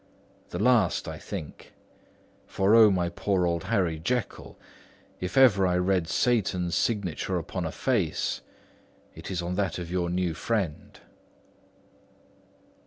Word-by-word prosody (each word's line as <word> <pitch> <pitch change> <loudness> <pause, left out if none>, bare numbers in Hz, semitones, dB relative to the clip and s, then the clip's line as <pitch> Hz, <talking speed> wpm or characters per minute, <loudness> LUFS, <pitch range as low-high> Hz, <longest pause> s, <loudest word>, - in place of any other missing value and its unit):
The - - -5
last, 110 -2 +2
I - - -6
think; 75 - -8 0.7
for, 95 +2 +1
O 115 -2 +8
my 90 -3 +1
poor 90 +2 0
old 85 -1 -1
Harry 85 -5 0
Jekyll, 120 +7 -3 0.6
if 90 +8 -4
ever 100 -8 +6
I 90 0 +1
read 90 -2 +1
Satan's 95 -8 0
signature 95 -4 -1
upon 90 +1 -4
a - - -5
face, 100 - -1 0.7
it - - -9
is 90 -3 -3
on 90 +1 -3
that 100 -2 -1
of 85 -1 -6
your 90 -1 -1
new 90 -1 -1
friend." 95 -5 -3
90 Hz, 130 wpm, -27 LUFS, 85-105 Hz, 0.7 s, O